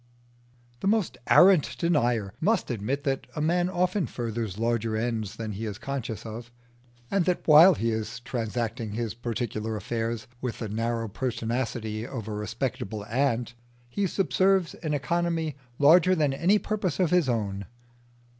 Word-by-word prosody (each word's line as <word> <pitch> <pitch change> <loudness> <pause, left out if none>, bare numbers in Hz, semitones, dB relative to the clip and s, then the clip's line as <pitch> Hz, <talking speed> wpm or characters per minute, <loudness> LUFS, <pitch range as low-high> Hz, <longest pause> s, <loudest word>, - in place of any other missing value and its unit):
The - - -2
most 215 -2 +1
arrant 160 -10 +6
denier 120 - +1
must 215 - +1
admit 120 +6 -2
that 135 -3 -1
a - - -3
man 175 +4 +2
often 180 0 0
furthers 115 -4 -4
larger 115 -1 0
ends 110 -3 -2
than 110 -1 -5
he 105 +3 -4
is 105 -2 -5
conscious 120 -5 -5
of, 115 +2 -7 0.6
and 195 -3 +2
that 180 -1 -1
while 165 +5 +9
he 115 +1 0
is 110 +1 -3
transacting 115 -3 -3
his 115 -1 -2
particular 115 -2 -3
affairs 115 +2 -3 0.2
with 125 -3 -3
the 110 - -5
narrow 115 +2 -1
pertinacity 115 -1 -3
of 115 -3 -6
a 110 - -4
respectable 105 0 -3
ant, 120 0 0 0.4
he 195 +10 0
subserves 190 0 +2
an 155 -3 -3
economy 165 +1 -1 0.2
larger 175 +6 +6
than 150 -5 +1
any 175 +9 +3
purpose 200 -7 -2
of 180 -4 +2
his 180 -6 +3
own. 100 -5 -2
120 Hz, 150 wpm, -27 LUFS, 110-165 Hz, 0.6 s, while